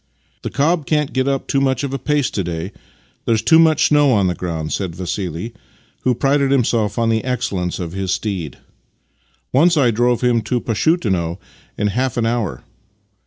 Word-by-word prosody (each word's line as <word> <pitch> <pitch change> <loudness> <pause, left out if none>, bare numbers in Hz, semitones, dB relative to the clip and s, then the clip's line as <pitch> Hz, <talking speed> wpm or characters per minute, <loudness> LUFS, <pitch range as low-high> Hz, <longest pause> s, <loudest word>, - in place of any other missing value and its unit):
" - - -41
The - - -4
cob 155 +2 0
can't 150 -2 0
get 130 +1 0
up 135 -1 -1
much 135 -1 +1
of 140 -1 -3
a 135 - -2
pace 150 -3 0
to 100 - -2
day; 85 +2 -4 0.5
there's 115 -2 +1
too 160 - +6
much 160 -2 +4
snow 145 -2 +4
on 100 -3 +3
the 90 - +1
ground," 80 -4 -4
said 90 -4 -3
Vassili, 90 +3 -4 0.5
who 125 -1 +1
prided 140 +2 +2
himself 115 -6 +1
on 115 -1 +1
the 110 -1 +1
excellence 115 -9 -2
of 85 -3 -5
his 95 0 -3
steed. 90 - -3 0.5
" 60 +1 -42
Once 165 +5 +4
I 130 -5 +4
drove 120 +2 +1
him 120 -2 +2
to 120 +3 -1
Pashutino 105 - 0 0.4
in 105 0 +1
half 125 +4 -1
an 115 - +1
hour." 115 -5 -2
115 Hz, 185 wpm, -19 LUFS, 95-135 Hz, 0.5 s, too